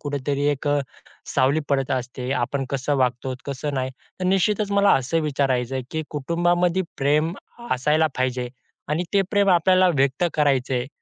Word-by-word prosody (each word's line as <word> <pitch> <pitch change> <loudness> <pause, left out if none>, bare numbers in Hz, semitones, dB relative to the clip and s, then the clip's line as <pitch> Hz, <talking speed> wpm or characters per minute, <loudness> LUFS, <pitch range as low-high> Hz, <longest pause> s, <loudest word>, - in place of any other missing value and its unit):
कुठेतरी 145 0 -2
एक 145 0 -4
अ, 145 - +3 0.6
सावली 140 +3 +3
पडत 135 -1 0
असते. 125 -1 -3
आपण 135 +3 -1
कसं 140 +1 -1
वागतो, 130 0 0
कसं 140 +1 -3
नाही. 130 -1 -1 0.3
तर - - -2
निश्चितच 195 +3 +1
मला 200 0 +4
असं 165 +6 0
विचारायचं 135 -4 0
आहे 130 - -2
की 160 0 -2
कुटुंबामध्ये 175 +4 +1 0.2
प्रेम 150 +4 +2 0.4
असायला 150 +5 +2
पाहिजे, 125 -1 -1 0.4
आणि 155 +4 0
ते 200 - +4
प्रेम 205 -2 +2
आपल्याला 185 +1 +4
व्यक्त 135 +4 +2
करायचं 135 -4 +1
आहे. 125 0 -1
145 Hz, 160 wpm, -23 LUFS, 130-170 Hz, 0.6 s, मला